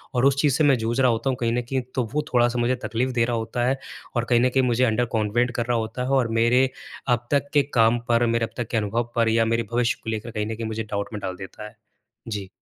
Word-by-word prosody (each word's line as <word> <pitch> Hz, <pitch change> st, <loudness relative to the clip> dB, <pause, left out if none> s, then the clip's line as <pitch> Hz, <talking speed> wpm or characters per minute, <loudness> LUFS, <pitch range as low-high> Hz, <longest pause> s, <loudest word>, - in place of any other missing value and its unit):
और 125 Hz, +1 st, +3 dB
उस 140 Hz, -1 st, +4 dB
चीज़ 145 Hz, -3 st, +3 dB
से 155 Hz, -, +2 dB
मैं 140 Hz, -3 st, +5 dB
जूझ 115 Hz, +3 st, -1 dB
रहा 130 Hz, -, +5 dB
होता 115 Hz, +4 st, -1 dB
हूँ 130 Hz, -, -1 dB
कहीं 115 Hz, -1 st, +1 dB
न 125 Hz, -, +1 dB
कहीं 135 Hz, -1 st, 0 dB
तो 130 Hz, -, +1 dB
वो 150 Hz, -, +1 dB
थोड़ा-सा 120 Hz, 0 st, +3 dB
मुझे 120 Hz, +2 st, +2 dB
तकलीफ़ 125 Hz, +3 st, -1 dB
दे 120 Hz, -1 st, +2 dB
रहा 120 Hz, 0 st, -1 dB
होता 120 Hz, +2 st, -2 dB
है। 135 Hz, -, +1 dB, 0.4 s
और 120 Hz, 0 st, +1 dB
कहीं 120 Hz, -1 st, +4 dB
न 130 Hz, -, +4 dB
कहीं 130 Hz, +1 st, +2 dB
मुझे 125 Hz, 0 st, +2 dB
अंडर 120 Hz, +1 st, +1 dB
कॉन्वेंट 115 Hz, +3 st, +1 dB
कर 120 Hz, -, -1 dB
रहा 120 Hz, 0 st, +1 dB
होता 110 Hz, +2 st, -3 dB
है। -, -, -3 dB
और 125 Hz, -, +1 dB
मेरे 125 Hz, +3 st, +4 dB, 0.5 s
अब 120 Hz, 0 st, -11 dB
तक 140 Hz, 0 st, +1 dB
के 145 Hz, -1 st, +5 dB
काम 115 Hz, 0 st, +4 dB
पर 120 Hz, 0 st, +4 dB
मेरे 115 Hz, 0 st, +1 dB
अब 115 Hz, -, -12 dB
तक 120 Hz, -3 st, -2 dB
के 115 Hz, -, +1 dB
अनुभव 115 Hz, +3 st, -1 dB
पर 115 Hz, -1 st, +3 dB
या 115 Hz, 0 st, +3 dB
मेरे 115 Hz, +1 st, +1 dB
भविष्य 120 Hz, 0 st, +1 dB
को -, -, -4 dB
लेकर 110 Hz, +1 st, -4 dB
कहीं 105 Hz, -1 st, -2 dB
न 110 Hz, +1 st, -4 dB
कहीं 115 Hz, 0 st, -4 dB
मुझे 110 Hz, 0 st, -3 dB
डाउट 100 Hz, -2 st, -4 dB
में 105 Hz, -, -4 dB
डाल 95 Hz, -1 st, -4 dB
देता 95 Hz, +3 st, -9 dB
है। -, -, -15 dB, 0.5 s
जी। 100 Hz, -3 st, -4 dB
120 Hz, 285 wpm, -24 LUFS, 110-125 Hz, 0.5 s, मैं